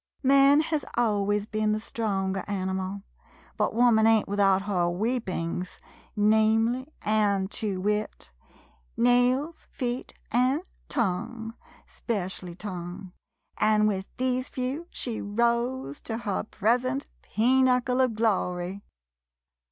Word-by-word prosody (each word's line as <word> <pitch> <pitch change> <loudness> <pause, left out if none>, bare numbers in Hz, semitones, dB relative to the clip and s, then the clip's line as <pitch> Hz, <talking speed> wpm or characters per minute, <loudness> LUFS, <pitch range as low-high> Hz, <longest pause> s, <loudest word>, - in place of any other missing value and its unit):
Man 275 +2 +6
hez 310 -2 -1
always 205 -3 +1
ben 215 0 0
the 215 - -1
stronger 195 -4 -2
animal, 190 0 -3 0.5
but - - 0
woman 230 -2 +5
ain't 225 -1 +4
without 195 -1 +3
her 180 -4 0
weapings 185 -4 -2 0.2
— - - -31
namely 220 +4 +3 0.2
and 205 -2 +1
to 200 -4 -2
wit, 210 - -2 0.7
nails, 250 +6 +2
feet, 245 -1 -4 0.2
and 255 +6 +2 0.3
tongue, 225 +1 -2 0.2
— - - -23
specially 185 -5 -4
tongue, 180 -1 -7 0.2
— - - -53 0.2
an' 215 0 +4
with 195 -2 -1
these 255 0 0
few, 265 +7 -3
she 235 -3 -4
rose 235 - -1
to 225 - -4
her 205 -3 -2
present 250 +6 0 0.2
peenuckle 250 +2 +3
of 245 -4 0
glory! 190 -3 -1
220 Hz, 115 wpm, -27 LUFS, 195-245 Hz, 0.7 s, Man